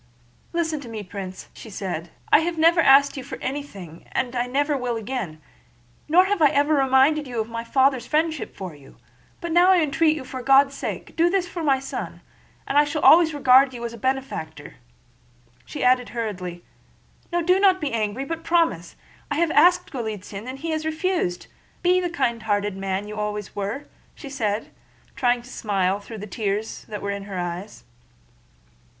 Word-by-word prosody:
"Listen 325 -3 -1
to 255 -4 -10
me, 220 -2 -6
Prince," 185 -1 -8
said 190 -6 -5
she. - - 0
"I - - +8
have 330 +1 -2
never 330 +2 +5
yet - - +4
asked 280 +1 +6
you 265 - -5
for 265 0 -7
anything 205 - -7
and 255 0 -1
I 245 0 0
never 285 +3 0
will 250 -3 -2
again, 220 -8 -4 0.7
nor 360 +4 +6
have 400 -2 -1
I 300 - +8
ever 290 +2 +2
reminded 275 +2 +3
you 240 -2 -4
of 220 - -1
my 230 0 -4
father's 265 +1 +2
friendship 315 -1 -1
for 185 -4 -7
you; 140 -2 -17 0.4
but 340 -1 -4
now 350 +2 +5
I 375 -1 +6
entreat 315 0 +2
you 295 - -6
for 260 0 -6
God's 275 +2 +5
sake 275 - -5
to - - -17
do 335 +1 +3
this 365 -1 0
for 350 -1 -6
my 280 -4 +3
son—and 275 +1 -7
I - - +6
shall 295 +1 -3
always 325 0 +7
regard 265 -1 +5
you 235 0 -5
as 235 - -5
a - - -9
benefactor," 260 - -4 0.9
she 300 - -5
added 250 0 +3
hurriedly. 185 -7 -5 0.7
"No, 345 0 0
don't 375 +2 +4
be 295 -4 -2
angry, 220 +4 -1
but 330 +3 -5
promise! 330 - +1 0.3
I 285 - -1
have 330 +1 +1
asked 355 +1 +4
Golítsyn 215 -3 -6
and 260 +1 -6
he 325 +4 -4
has 315 0 -2
refused. 315 - -1 0.4
Be 365 +1 +4
the 355 - -1
kindhearted 220 - -1
man 195 +1 -3
you 210 0 -7
always 210 -1 -4
were," 205 +8 -4 0.3
she 275 - -10
said, 215 -6 -2 0.4
trying 245 -1 +1
to 245 - -14
smile 195 -3 0
though 220 +2 -10
tears 210 +1 -4
were 200 -1 -4
in 200 0 -5
her 195 -2 -6
eyes. 175 - -5
260 Hz, 180 wpm, -23 LUFS, 210-310 Hz, 0.9 s, I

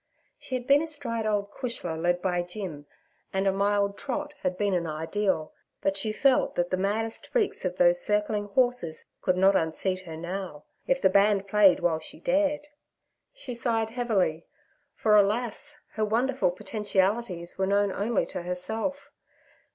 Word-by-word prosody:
She 255 - -5
had 245 -1 -3
been 280 +2 +5
astride 235 -8 -3
old 205 -1 0
Cushla 205 -10 -4
led 175 +2 0
by 180 -2 +1
Jim, 175 -5 -7 0.4
and 190 0 0
a 195 - +4
mild 200 +1 +1
trot 295 +2 -3
had 185 -1 -1
been 205 -1 +1
an 170 -2 0
ideal; 160 +2 -1 0.3
but 195 - +1
she 215 +2 +1
felt 265 +4 +2
that 175 0 0
the - - +3
maddest 215 +4 -1
freaks 460 -4 -1
of - - -2
those - - +4
circling 210 - 0
horses 245 -7 0 0.2
could 185 -1 +1
not 195 +1 +5
unseat 185 +3 0
her 160 -1 -6
now, 175 -2 -5 0.2
if 270 - +2
the 190 - +4
band 200 0 +3
played 195 -3 +5
while 165 -2 +1
she 160 - -9
dared. 295 - +1 0.7
She 275 - -6
sighed 225 -2 -1
heavily, 205 -9 0 0.5
for, 215 -1 +3
alas! 230 +8 +1 0.2
her 215 - -2
wonderful 240 +2 +1
potentialities 190 -1 -1
were 190 - +2
known 200 0 +2
only 210 +3 0
to - - -5
herself. 220 +11 -3
205 Hz, 160 wpm, -27 LUFS, 180-235 Hz, 0.7 s, been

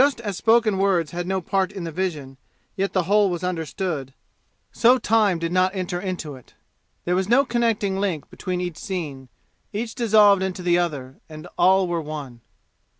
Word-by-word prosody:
Just 280 -3 +1
as 205 -4 -4
spoken 220 -1 +3
words 185 -5 +1
had 175 0 -4
no 190 0 -1
part 190 +2 0
in 195 -3 -7
the 165 - -4
vision, 150 -7 -4 0.4
yet 195 -1 -1
the 185 - +1
whole 205 +3 +3
was 175 0 -4
understood, 165 -5 -3 0.6
so 245 +2 +4
time 215 -6 +2
did 165 0 -3
not 185 +1 +2
enter 180 -1 -3
into 180 -6 -4
it. 130 - -18 0.5
There 175 - 0
was 190 +2 0
no 270 +4 +5
connecting 225 -5 0
link 180 -8 -2
between 180 -1 -4
each 175 -3 -4
scene; 145 -9 -5 0.4
each 225 +2 -4
dissolved 210 -4 +5
into 190 -1 -3
the 175 0 +3
other, 140 -6 -3
and 155 +2 -10
all 190 +1 +4
were 170 -1 -1
one. 145 -6 -7
185 Hz, 180 wpm, -23 LUFS, 165-200 Hz, 0.6 s, no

